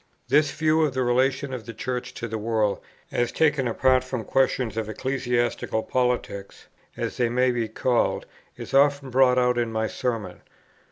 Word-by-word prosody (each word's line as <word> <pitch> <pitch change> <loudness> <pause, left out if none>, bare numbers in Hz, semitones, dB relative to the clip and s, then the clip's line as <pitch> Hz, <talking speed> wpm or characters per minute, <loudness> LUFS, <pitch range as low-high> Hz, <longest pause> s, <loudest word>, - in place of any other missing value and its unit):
This 145 +2 +4
view 155 +2 +1
of 150 -4 +1
the 130 - +1
relation 130 +2 +1
of 120 -3 -6
the 115 - -7
Church 125 -1 -4
to 115 - -4
the 110 -1 -4
world 110 -2 0 0.3
as 120 0 0
taken 150 -5 +2
apart 130 +2 +3
from 130 -3 -4
questions 130 0 +1
of 110 -1 -3
ecclesiastical 120 -2 -1
politics, 125 -6 -2 0.3
as - - -3
they 120 -2 +2
may 125 +1 +2
be 120 -2 -1
called, 120 +2 0 0.3
is - - -8
often 140 -1 +3
brought 130 0 +4
out 125 -1 +2
in 115 -1 -1
my 110 0 -1
Sermons. 110 -6 -3
125 Hz, 170 wpm, -25 LUFS, 115-130 Hz, 0.3 s, This